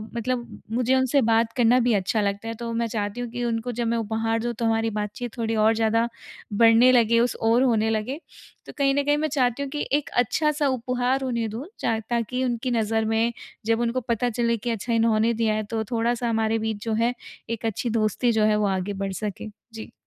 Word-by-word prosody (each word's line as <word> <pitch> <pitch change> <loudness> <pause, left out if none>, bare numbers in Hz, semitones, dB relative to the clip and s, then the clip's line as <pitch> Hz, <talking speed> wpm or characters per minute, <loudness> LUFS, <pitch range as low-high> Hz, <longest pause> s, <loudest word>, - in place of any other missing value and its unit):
मतलब 240 +1 -3
मुझे 250 +2 +2
उनसे 260 +1 +3
बात 230 0 +2
करना 245 +1 +5
भी 240 -1 +2
अच्छा 205 +2 +1
लगता 200 +2 -2
है 230 - -3
तो 235 -1 -3
मैं 235 0 0
चाहती 210 +1 -3
हूँ 245 - -4
कि 245 +1 -4
उनको 230 +1 -2
जब 240 -1 0
मैं 230 +1 +1
उपहार 225 +1 -1
दूँ 240 +1 -2
तो 230 +1 -3
हमारी 225 0 +1
बातचीत 215 +4 -5
थोड़ी 225 -1 -1
और 215 +1 +4
ज़्यादा 225 +1 +2 0.5
बढ़ने 230 +3 +6
लगे 230 -2 +4
उस 240 0 +1
ओर 230 +3 +3
होने 225 -3 +2
लगे। 225 +6 -2 0.5
तो - - -10
कहीं 275 -1 +3
न 285 - +2
कहीं 290 +1 +2
मैं 310 - 0
चाहती 265 -2 0
हूँ 280 - -5
कि 295 - -2
एक 290 0 +1
अच्छा-सा 295 +4 +1
उपहार 250 +1 0
उन्हें 235 -4 -1
दूँ 230 +7 -6
च 225 -2 0
ताकि 240 +2 -1
उनकी 245 +1 -2
नज़र 225 -1 +1
में 225 +2 +1 0.3
जब 225 0 +2
उनको 240 +2 0
पता 235 0 -1
चले 235 0 0
कि 235 +3 -4
अच्छा 230 +1 -2
इन्होंने 225 0 +3
दिया 225 -1 +1
है 215 - -1
तो 225 -1 -1
थोड़ा-सा 235 +1 0
हमारे 225 0 +1
बीच 220 -1 -3
जो 225 - -2
है, 230 +2 +1 0.4
एक 230 0 -4
अच्छी 225 +2 -2
दोस्ती 225 +2 +1
जो 220 -1 +2
है 215 - +3
वो 210 0 +1
आगे 190 +1 -1
बढ़ 195 0 -3
सके। 210 +1 -4 0.3
जी। 220 0 -8
230 Hz, 220 wpm, -24 LUFS, 220-245 Hz, 0.5 s, बढ़ने